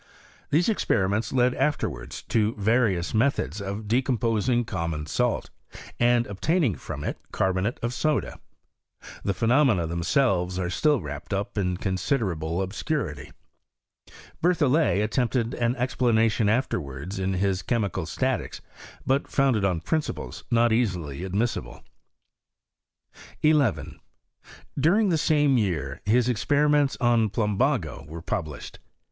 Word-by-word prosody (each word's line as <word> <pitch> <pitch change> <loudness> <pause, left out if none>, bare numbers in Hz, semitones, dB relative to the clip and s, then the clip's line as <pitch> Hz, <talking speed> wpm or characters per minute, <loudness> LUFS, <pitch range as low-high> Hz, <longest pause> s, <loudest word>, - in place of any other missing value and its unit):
These 165 +4 +2
experiments 100 - +1
led 125 -1 +3
afterwards 150 +3 -2
to 110 0 +1
various 105 -5 +1
methods 110 - 0
of 100 +2 -5
decomposing 120 0 +1
com 85 -6 -3
mon 75 -2 -4
salt, 75 - -1 0.5
and 120 0 +3
obtaining 135 - 0
from - - -7
it - - -4
carbonate 95 +5 0
of 120 +1 -1
soda. 155 +2 -1 0.8
The 100 - -1
phenomena 115 - +3
themselves 90 - +1
are 90 -1 -2
still 150 - +2
wrapped 75 +6 -5
up 100 +1 -3
ia 90 -3 0
considerable 95 - -1
obscurity. 95 - -3 1.1
Berlhollet 155 - +3
attempted 120 +1 0
an 120 +1 0
explanation 115 -4 +2
afterwards 95 - -2
in 95 0 -1
his 95 0 0
Chemical 100 -7 -1
Statics; - - -2 0.5
but 135 +2 +1
founded 130 -7 +2
on 90 -4 +1
principles 155 - -3
not 120 -1 +3
easily 90 - -1
admissible. 100 +5 -2 1.6
11. 150 -7 +2 0.8
During 195 +9 +3
the 165 -3 +2
same 145 -5 +3
year, 80 -9 -2
his 120 +3 +3
experiments 145 +4 +2
on 120 -3 +3
plumbago 105 - 0
were 80 +2 -8
published. 75 -5 -5
110 Hz, 115 wpm, -25 LUFS, 95-130 Hz, 1.6 s, led